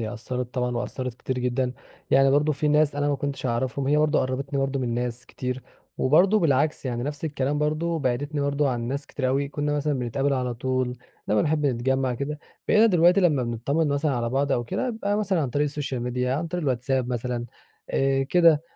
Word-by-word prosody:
هي 110 0 -3
أثرت 125 +1 -5
طبعًا 125 -1 -1
وأثرت 125 0 -3
كتير 130 +1 -4
جدًا. 125 0 0 0.4
يعني 135 0 +5
برضه 145 +2 +3
في 150 +1 -1
ناس 150 -1 +3
أنا 145 0 0
ما 145 - +2
كنتش 140 -2 -3
أعرفهم 130 +3 -1
هي 150 - +3
برضه 150 -1 +3
قربتني 135 +2 -2
برضه 135 0 0
من 120 -2 -1
ناس 120 0 -3
كتير، 125 0 -4 0.4
وبرضه 180 +10 +4
بالعكس 150 -1 +1
يعني 120 -1 -2
نفس 145 +4 -4
الكلام 145 -1 -1
برضه 155 +3 0
بعدتني 145 +2 -1
برضه 140 0 +1
عن 120 -2 -2
ناس 140 +2 -3
كتير 130 -2 -2
أوي 140 +2 0
كنا 145 0 -1
مثلًا 150 +1 0
بنتقابل 135 +3 0
على 125 -2 -1
طول، 130 +1 -1 0.3
لما 105 0 +3
بنحب 150 -1 +1
نتجمع 130 0 0
كده. 145 +4 -4 0.3
بقينا 220 +2 +6
دلوقتي 180 -1 +5
لما 150 -8 +3
بنطمن 135 +7 0
مثلًا 145 +1 +1
على 120 -1 -1
بعض 140 +1 +1
أو 120 - 0
كده 250 - -2
يبقى 205 -3 -1
مثلًا 200 -5 +1
عن 130 - -2
طريق 145 +4 +1
السوشيال 145 -3 -3
ميديا 125 +1 -1
عن 160 +4 -2
طريق 175 +1 -3
الواتساب 130 -1 0
مثلًا 120 -1 -2 0.4
آآ، 135 0 +2
كده. 160 +1 +4
135 Hz, 200 wpm, -25 LUFS, 125-150 Hz, 0.4 s, بقينا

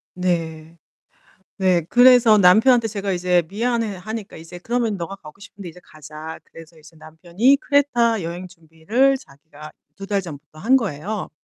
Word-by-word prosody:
네. 165 -3 -3 0.8
네 185 -3 +2
그래서 245 -3 +6
남편한테 225 +5 +4
제가 200 -2 -4
이제 180 -1 +1
미안해하니까 220 -1 -4
이제 165 +2 -11
그러면 230 0 -2
"네가 175 +3 -6
가고 155 0 -15
싶은데 200 -2 -11
이제 175 +2 -15
가자." 155 +1 -11
그래서 165 0 -16
이제 160 +1 -18
남편이 170 - 0
크레타 240 -7 +1
여행 175 +2 -6
준비를 180 +11 -1
자기가 150 - -15 0.2
2 195 0 -10
달 200 -1 -1
전부터 155 -2 -12
한 245 +8 +2
거예요. 205 - -3
185 Hz, 325 characters per minute, -20 LUFS, 160-225 Hz, 0.8 s, 그래서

